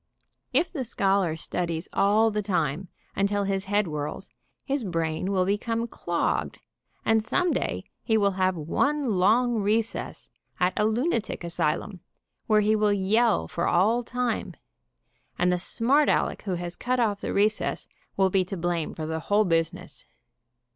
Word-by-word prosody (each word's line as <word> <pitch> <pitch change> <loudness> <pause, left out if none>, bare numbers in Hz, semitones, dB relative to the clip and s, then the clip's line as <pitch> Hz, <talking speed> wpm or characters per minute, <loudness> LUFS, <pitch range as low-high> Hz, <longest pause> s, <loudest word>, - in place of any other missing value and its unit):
If 355 - +1
the 275 -6 -2
scholar 195 -7 +1
studies 165 +1 -3
all 215 +3 +3
the 210 0 -1
time, 180 -3 -1 0.3
until 200 +1 +1
his 195 0 -1
head 205 +1 +1
whirls, 150 -3 -5 0.4
his 275 -2 -1
brain 165 0 -2
will 185 -2 +2
become 225 +4 -1
clogged 175 -6 -2 0.5
and 225 -1 +3
some 360 +9 +1
day - - -2 0.2
he 220 -2 +1
will 200 -2 +3
have 185 0 +1
one 230 - 0
long 230 +4 +3
recess 215 +3 -1 0.3
at 180 0 +2
a 210 - +2
lunatic 230 - -1
asylum, 170 +3 -2 0.5
where 215 -1 +4
he 215 +1 +3
will 210 -1 +2
yell 200 - +2
for - - -2
all 215 +7 +3
time, 245 0 -2 0.8
and 180 0 +2
the 180 - +1
smart 270 +10 +3
Aleck - - +1
who 190 -3 -1
has 175 0 -5
cut 250 +1 -1
off 210 -4 +1
the - - -3
recess 210 +2 0 0.3
will 190 -1 +3
be 190 0 +3
to 195 +1 -5
blame 170 -1 -2
for 160 - -4
the 160 +1 -3
whole 205 +6 +2
busi 165 -2 +1
ness. - - -11
200 Hz, 160 wpm, -26 LUFS, 175-225 Hz, 0.8 s, where